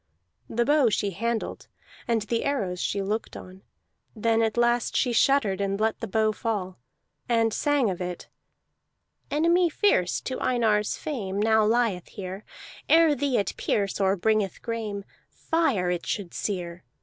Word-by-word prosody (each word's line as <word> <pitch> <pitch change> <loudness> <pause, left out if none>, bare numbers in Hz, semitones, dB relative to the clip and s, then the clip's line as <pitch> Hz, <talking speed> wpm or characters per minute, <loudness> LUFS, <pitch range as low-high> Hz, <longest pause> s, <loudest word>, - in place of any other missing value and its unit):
The 235 +1 0
bow 290 -3 +4
she 205 -1 0
handled, 230 +4 -3 0.4
and 230 -3 +1
the 230 +2 -1
arrows 200 -11 -1
she 200 -1 -1
looked 210 +3 -3
on; 185 +1 -12 0.5
then 225 +1 +2
at 225 0 0
last 240 0 +2
she 245 -3 +2
shuddered 225 -6 +3
and 200 0 -1
let 220 0 0
the 225 - -4
bow 215 +2 +2
fall, 205 - -3 0.5
and 225 -2 +2
sang 290 -2 +2
of 185 -2 -3
it: 180 -1 -5 1.0
"Enemy 340 +4 +3
fierce 295 - +2
To 260 - -4
Einar's 220 -4 +1
fame, 205 -11 -4
Now 220 +1 +4
lieth 225 -6 +1
here. 190 +1 -7 0.5
Ere 325 -1 +6
thee 280 -2 0
it 200 - -1
pierce, 200 -2 -1
Or 195 0 +3
bringeth 210 0 0
grame, 215 -4 -4 0.2
Fire 250 - 0
it 175 -1 -3
should 190 -5 -3
sear. 180 -3 -4
220 Hz, 150 wpm, -26 LUFS, 195-240 Hz, 1.0 s, Ere